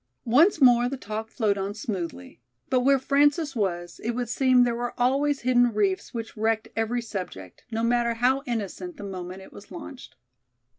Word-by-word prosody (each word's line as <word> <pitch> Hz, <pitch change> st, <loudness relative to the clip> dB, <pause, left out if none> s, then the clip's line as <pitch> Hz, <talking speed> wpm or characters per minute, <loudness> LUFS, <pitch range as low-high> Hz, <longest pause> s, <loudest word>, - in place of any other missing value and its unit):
Once 305 Hz, -, +4 dB
more 245 Hz, -2 st, +5 dB
the 275 Hz, -, -4 dB
talk 215 Hz, -1 st, -5 dB
flowed 210 Hz, -4 st, 0 dB
on 195 Hz, +1 st, -3 dB
smoothly. 170 Hz, -, -6 dB, 0.3 s
But 255 Hz, -, +4 dB
where 275 Hz, +2 st, +4 dB
Frances 290 Hz, +3 st, +2 dB
was, 175 Hz, -5 st, -3 dB
it 235 Hz, -, -1 dB
would 245 Hz, -2 st, -3 dB
seem 255 Hz, 0 st, +4 dB
there 240 Hz, -1 st, +1 dB
were 240 Hz, +1 st, -4 dB
always 275 Hz, +3 st, +2 dB
hidden 245 Hz, -1 st, +3 dB
reefs 200 Hz, -3 st, 0 dB
which 230 Hz, -1 st, -6 dB
wrecked 220 Hz, 0 st, 0 dB
every 230 Hz, +2 st, -1 dB
subject, 180 Hz, -, -7 dB
no 225 Hz, 0 st, -2 dB
matter 235 Hz, 0 st, +1 dB
how 255 Hz, +4 st, +2 dB
innocent, 240 Hz, -, -4 dB
the -, -, -8 dB
moment 185 Hz, -1 st, -7 dB
it -, -, -15 dB
was 200 Hz, -, -13 dB
launched. 270 Hz, -, -10 dB
235 Hz, 180 wpm, -26 LUFS, 205-255 Hz, 0.3 s, more